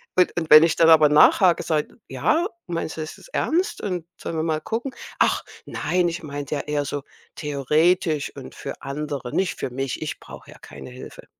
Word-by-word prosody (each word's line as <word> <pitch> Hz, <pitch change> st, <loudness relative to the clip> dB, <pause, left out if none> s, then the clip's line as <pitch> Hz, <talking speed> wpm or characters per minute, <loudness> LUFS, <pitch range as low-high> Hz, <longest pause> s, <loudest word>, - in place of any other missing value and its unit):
Und 180 Hz, -1 st, +4 dB
und 160 Hz, -2 st, -5 dB
wenn 155 Hz, +1 st, +11 dB
ich 165 Hz, -1 st, +2 dB
dann 165 Hz, -1 st, +5 dB
aber 155 Hz, -2 st, +7 dB
nachhake 170 Hz, +4 st, +5 dB
und -, -, -12 dB
sage: 155 Hz, +5 st, -1 dB
„Ja, 340 Hz, +4 st, +1 dB, 0.2 s
meinst 165 Hz, -2 st, -4 dB
du -, -, -3 dB
das 155 Hz, -, -7 dB
jetzt -, -, -17 dB
ernst 360 Hz, +6 st, 0 dB
und 180 Hz, -5 st, -3 dB
sollen 165 Hz, -, -6 dB
wir 155 Hz, -, 0 dB
mal 155 Hz, -1 st, -1 dB
gucken?“ 240 Hz, -, -4 dB, 0.3 s
„Ach -, -, +2 dB, 0.2 s
nein, 180 Hz, -1 st, 0 dB
ich 170 Hz, +1 st, -5 dB
meinte 145 Hz, 0 st, -5 dB
ja 140 Hz, -, -2 dB
eher 145 Hz, -1 st, -2 dB
so 145 Hz, 0 st, -4 dB, 0.3 s
theoretisch 150 Hz, +2 st, +1 dB
und -, -, -10 dB
für -, -, -7 dB
andere, 140 Hz, -2 st, -5 dB
nicht 190 Hz, -1 st, 0 dB
für 125 Hz, -, -3 dB
mich. 135 Hz, 0 st, -4 dB
Ich 155 Hz, -, -5 dB
brauche -, -, -12 dB
ja -, -, -15 dB
keine -, -, -11 dB
Hilfe.” 125 Hz, -, -11 dB
155 Hz, 205 wpm, -23 LUFS, 145-175 Hz, 0.3 s, wenn